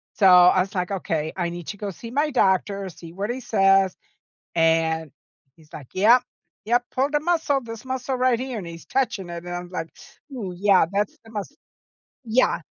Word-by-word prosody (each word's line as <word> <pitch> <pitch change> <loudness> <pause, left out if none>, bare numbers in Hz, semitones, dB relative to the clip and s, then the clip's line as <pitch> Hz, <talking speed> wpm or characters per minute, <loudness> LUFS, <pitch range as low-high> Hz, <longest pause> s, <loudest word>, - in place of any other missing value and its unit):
So, 205 - +2
I 180 0 +7
was 195 +2 -4
like, 180 -1 -1
"Okay, 160 -5 -2
I 175 -1 -1
need 175 -1 -8
to 205 - -6
go 200 -1 -4
see 230 +5 -10
my 295 +3 +1
doctor, 195 -3 +1
see 165 -1 -12
what 200 +4 -4
he 250 - -3
says," 195 -4 +3 0.6
and 160 -1 +2 0.5
he's 155 -2 -22
like, 135 -4 -9
"Yep. 225 +6 +5 0.4
Yep. 240 +2 +2
Pulled 275 +3 0
a - - +4
muscle, 315 -4 +1
this 230 +1 -9
muscle 260 0 -3
right 255 -2 +2
here," 255 -2 -4
and 185 -5 -6
he's 165 0 -10
touching 210 -9 -1
it, 170 0 -7
and 175 0 -5
I 175 - -3
was 175 - -12
like, 165 -3 -4 0.4
"Ooh, 200 -8 -5
yeah, 195 -2 +4
that's 210 +10 -1
the 225 - -14
muscle." 215 +7 -6 0.7
Yeah. 235 +3 +2
195 Hz, 200 wpm, -23 LUFS, 175-245 Hz, 0.7 s, I